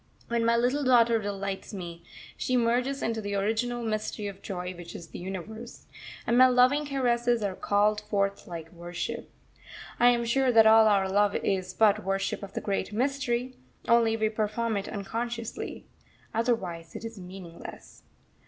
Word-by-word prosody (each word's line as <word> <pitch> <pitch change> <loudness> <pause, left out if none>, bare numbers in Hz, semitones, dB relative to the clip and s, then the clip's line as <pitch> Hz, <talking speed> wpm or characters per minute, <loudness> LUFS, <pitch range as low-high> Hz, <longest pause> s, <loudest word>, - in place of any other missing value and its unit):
When 235 0 +1
my 230 0 +3
little 255 +5 +1
daughter 235 -3 +5
delights 195 0 -4
me, 170 -2 -7 0.3
she 255 - 0
merges 245 +3 +1
into 225 -1 -1
the 205 -1 -3
original 225 +4 -1
mystery 215 -1 -3
of 200 -1 -6
joy 180 -2 -5
which 175 -1 -10
is 170 - -9
the - - -8
Universe; 205 +6 -7 0.4
and 235 - +2
my 255 +1 +8
loving 255 +4 +4
caresses 240 -4 +1
are 200 -2 -1
called 210 +2 +1
forth 200 -1 0
like 165 -2 -7
worship. 175 0 -5 0.7
I 240 - +6
am 240 -1 +2
sure 260 +2 +2
that 225 -1 +7
all 220 0 +7
our 200 -2 +3
love 205 +1 +2
is 185 -2 -1
but 215 0 +4
worship 195 +1 -1
of 200 -1 -8
the - - -3
Great 200 -1 -2
Mystery, 255 +1 -1 0.3
only 230 -1 +4
we 220 -1 +1
perform 220 +1 -1
it 200 -1 -3
unconsciously. 230 +3 -5 0.5
Otherwise 195 -8 -1
it - - -6
is 225 -2 -7
meaningless. 180 -2 -10
220 Hz, 160 wpm, -28 LUFS, 195-235 Hz, 0.7 s, my